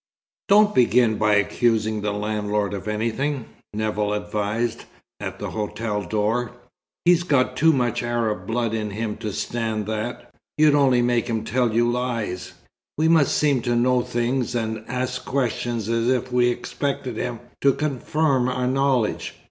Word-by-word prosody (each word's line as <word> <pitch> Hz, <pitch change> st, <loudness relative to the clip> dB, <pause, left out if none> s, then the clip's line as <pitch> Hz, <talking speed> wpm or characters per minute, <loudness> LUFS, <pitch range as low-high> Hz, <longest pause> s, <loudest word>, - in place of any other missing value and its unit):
XIV -, -, -75 dB
"Don't 210 Hz, +1 st, +5 dB
begin 120 Hz, -3 st, +4 dB
by 105 Hz, -1 st, +3 dB
accusing 110 Hz, +1 st, +1 dB
the 105 Hz, 0 st, -1 dB
landlord 105 Hz, 0 st, -1 dB
of 100 Hz, +1 st, -5 dB
anything," 115 Hz, +5 st, -1 dB, 0.3 s
Nevill 105 Hz, 0 st, -1 dB
advised, 105 Hz, +3 st, -2 dB, 0.3 s
at -, -, -5 dB
the -, -, -5 dB
hotel 105 Hz, 0 st, -3 dB
door. 110 Hz, +6 st, -1 dB, 0.5 s
"He's 175 Hz, -1 st, +5 dB
got 140 Hz, -7 st, +1 dB
too 160 Hz, +5 st, +5 dB
much 125 Hz, -6 st, 0 dB
Arab 120 Hz, -3 st, -1 dB
blood 115 Hz, -1 st, -1 dB
in 110 Hz, -1 st, -2 dB
him 105 Hz, +1 st, -3 dB
to 105 Hz, -, -4 dB
stand 110 Hz, 0 st, -2 dB
that. 110 Hz, +3 st, -5 dB, 0.2 s
You'd 150 Hz, -1 st, +5 dB
only 130 Hz, -4 st, +4 dB
make 120 Hz, -1 st, +1 dB
him 110 Hz, -2 st, -1 dB
tell 120 Hz, +1 st, +1 dB
you 120 Hz, +2 st, +2 dB
lies. 120 Hz, -6 st, -2 dB, 0.4 s
We 160 Hz, +2 st, +3 dB
must 160 Hz, -5 st, +4 dB
seem 145 Hz, -4 st, +2 dB
to 120 Hz, 0 st, 0 dB
know 125 Hz, +1 st, +3 dB
things, 120 Hz, +1 st, -1 dB
and 110 Hz, -1 st, -2 dB
ask 125 Hz, 0 st, -3 dB
questions 120 Hz, -4 st, -1 dB
as 115 Hz, +1 st, +1 dB
if 130 Hz, 0 st, 0 dB
we 125 Hz, 0 st, +3 dB
expected 125 Hz, 0 st, -3 dB
him 115 Hz, 0 st, -3 dB, 0.2 s
to 140 Hz, -, +5 dB
confirm 140 Hz, -2 st, 0 dB
our 125 Hz, 0 st, -1 dB
knowledge. 130 Hz, -3 st, 0 dB
120 Hz, 155 wpm, -23 LUFS, 110-130 Hz, 0.5 s, Don't